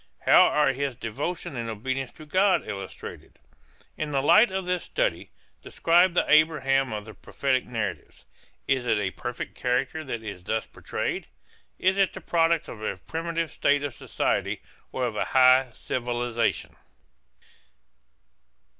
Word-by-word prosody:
How -, -, +7 dB
are 150 Hz, -3 st, +2 dB
his 135 Hz, -1 st, -2 dB
devotion 135 Hz, +8 st, -4 dB
and 115 Hz, -1 st, -4 dB
obedience 130 Hz, +4 st, -3 dB
to 155 Hz, -, -13 dB
God 185 Hz, +5 st, +2 dB
illustrated? 95 Hz, -2 st, -8 dB, 0.6 s
In 155 Hz, -, -3 dB
the 135 Hz, -2 st, 0 dB
light 215 Hz, +10 st, +6 dB
of 190 Hz, 0 st, -3 dB
this 180 Hz, 0 st, -1 dB
study -, -, -1 dB, 0.3 s
describe 175 Hz, +2 st, +3 dB
the -, -, +3 dB
Abraham 135 Hz, -4 st, +3 dB
of 105 Hz, -1 st, -5 dB
the 110 Hz, -, -9 dB
prophetic 130 Hz, +2 st, -1 dB
narratives. 115 Hz, -3 st, -5 dB, 0.4 s
Is 130 Hz, -2 st, +1 dB
it 110 Hz, -2 st, +3 dB
a 100 Hz, -2 st, -1 dB
perfect 120 Hz, +4 st, -6 dB
character 125 Hz, +5 st, -1 dB
that 120 Hz, -5 st, -5 dB
is 100 Hz, -5 st, -7 dB
thus 110 Hz, +3 st, -1 dB
portrayed? -, -, -4 dB, 0.5 s
Is 190 Hz, +1 st, +2 dB
it 195 Hz, -, +3 dB
the -, -, -7 dB
product 165 Hz, -1 st, +1 dB
of 110 Hz, -, -9 dB
a 105 Hz, -3 st, -3 dB
primitive 165 Hz, -, -3 dB
state 145 Hz, 0 st, +2 dB
of 145 Hz, -3 st, -3 dB
society -, -, -2 dB, 0.3 s
or 130 Hz, -, -1 dB
of 115 Hz, -3 st, -3 dB
a -, -, 0 dB
high 130 Hz, 0 st, +6 dB
civilization? 120 Hz, 0 st, -2 dB
135 Hz, 145 wpm, -26 LUFS, 120-165 Hz, 0.6 s, How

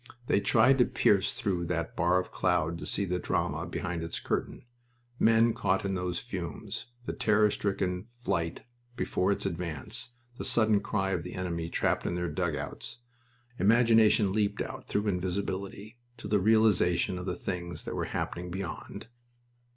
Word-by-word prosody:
They 100 Hz, -, +3 dB
tried 120 Hz, +6 st, +4 dB
to 125 Hz, -, +6 dB
pierce 100 Hz, -3 st, +3 dB
through 90 Hz, -4 st, -1 dB
that 85 Hz, -1 st, -2 dB
bar 90 Hz, +1 st, +3 dB
of 90 Hz, -, -5 dB
cloud 80 Hz, +2 st, +1 dB
to -, -, -5 dB
see 100 Hz, -, +1 dB
the 90 Hz, -1 st, -1 dB
drama -, -, -1 dB
behind 90 Hz, -2 st, -3 dB
its 80 Hz, 0 st, -3 dB
curtain -, -, -3 dB, 0.5 s
men 115 Hz, +1 st, +5 dB
caught 95 Hz, +1 st, 0 dB
in 100 Hz, -, 0 dB
those 90 Hz, -2 st, -2 dB
fumes, 95 Hz, -3 st, -5 dB, 0.2 s
the -, -, -3 dB
terror 105 Hz, -1 st, +3 dB
stricken 95 Hz, -1 st, -1 dB, 0.2 s
flight 85 Hz, -6 st, -1 dB, 0.3 s
before 95 Hz, -4 st, 0 dB
its 100 Hz, -, -1 dB
advance, 85 Hz, -, -4 dB, 0.3 s
the -, -, -3 dB
sudden 110 Hz, -3 st, +4 dB
cry 95 Hz, -1 st, -1 dB
of 90 Hz, -3 st, 0 dB
the 90 Hz, -, -7 dB
enemy 85 Hz, -2 st, -3 dB
trapped -, -, 0 dB
in 85 Hz, -, -1 dB
their 90 Hz, -1 st, -1 dB
dugouts. 75 Hz, -, -3 dB, 0.6 s
Imagination 110 Hz, -1 st, +5 dB
leaped 105 Hz, -1 st, 0 dB
out, -, -, -8 dB
through 105 Hz, -, 0 dB
invisibility, 100 Hz, +3 st, -3 dB, 0.2 s
to -, -, -7 dB
the 105 Hz, 0 st, +3 dB
realization 100 Hz, -3 st, +3 dB
of 90 Hz, -, -6 dB
the 90 Hz, -, -1 dB
things 85 Hz, -1 st, -5 dB
that -, -, -5 dB
were -, -, -1 dB
happening 90 Hz, +1 st, -3 dB
beyond. 95 Hz, -1 st, -6 dB
95 Hz, 160 wpm, -29 LUFS, 90-105 Hz, 0.6 s, to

